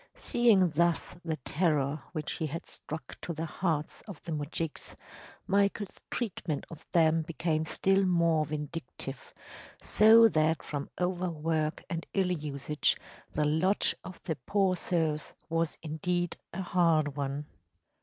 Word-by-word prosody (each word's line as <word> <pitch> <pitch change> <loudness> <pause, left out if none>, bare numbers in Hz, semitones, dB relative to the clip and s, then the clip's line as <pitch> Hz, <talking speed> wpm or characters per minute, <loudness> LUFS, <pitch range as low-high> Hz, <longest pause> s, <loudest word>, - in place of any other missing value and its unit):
Seeing 210 -8 +4
thus 170 +3 +1
the 165 -2 -1
terror 150 -3 +1
which 155 -3 -3
he 160 - -2
had 165 +3 -5
struck 155 +1 -8
to 170 - -4
the 160 +1 -3
hearts 160 -2 -2
of 195 -7 -8
the 170 - -6
moujiks, 150 +1 -4 0.5
Michael’s 200 0 +1
treatment 175 - -3
of 160 -1 -10
them 165 -1 +4
became 160 0 -1
still 195 +4 +2
more 170 -3 +3
vindictive, 150 -3 -6 0.5
so 225 +2 +7
that 155 -4 +2
from 145 -1 -4
over 180 0 0
work 155 -1 -1
and 170 -2 -4
ill 190 -2 +2
usage 150 -2 0 0.4
the 150 - +1
lot 160 +7 +3
of 185 - -9
the 160 -5 -2
poor 195 -2 +3
serfs 160 -3 -1 0.2
was 165 -1 0
indeed 175 +3 -1 0.2
a 190 +2 -4
hard 165 -5 +2
one. 140 +1 -2
165 Hz, 135 wpm, -30 LUFS, 155-180 Hz, 0.5 s, so